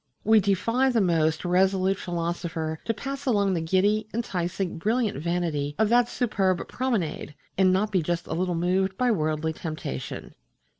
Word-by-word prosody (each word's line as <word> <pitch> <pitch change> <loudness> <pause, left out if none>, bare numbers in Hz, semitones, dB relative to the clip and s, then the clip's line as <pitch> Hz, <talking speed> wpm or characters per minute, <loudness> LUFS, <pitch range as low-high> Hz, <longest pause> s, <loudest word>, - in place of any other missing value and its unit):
We 220 +1 +5
defy 230 +7 +2
the 240 -3 +2
most 165 -4 +1
resolute 190 +1 +2
philosopher 170 -2 -3
to 225 - 0
pass 275 +4 -5
along 200 -5 +2
the 170 - 0
giddy, 200 +6 +2
enticing, 180 -5 -2
brilliant 220 - 0
vanity 160 -4 -1
of 220 -1 +2
that 240 0 +4
superb 195 -7 0
promenade 215 - -2 0.2
and 185 -1 +4
not 200 +3 +1
be 185 -3 +2
just 170 +2 -2
a - - -4
little 180 0 -1
moved 185 +3 0
by 250 -1 +2
worldly 155 -4 0
temptation. 155 - -6
185 Hz, 155 wpm, -26 LUFS, 170-215 Hz, 0.2 s, We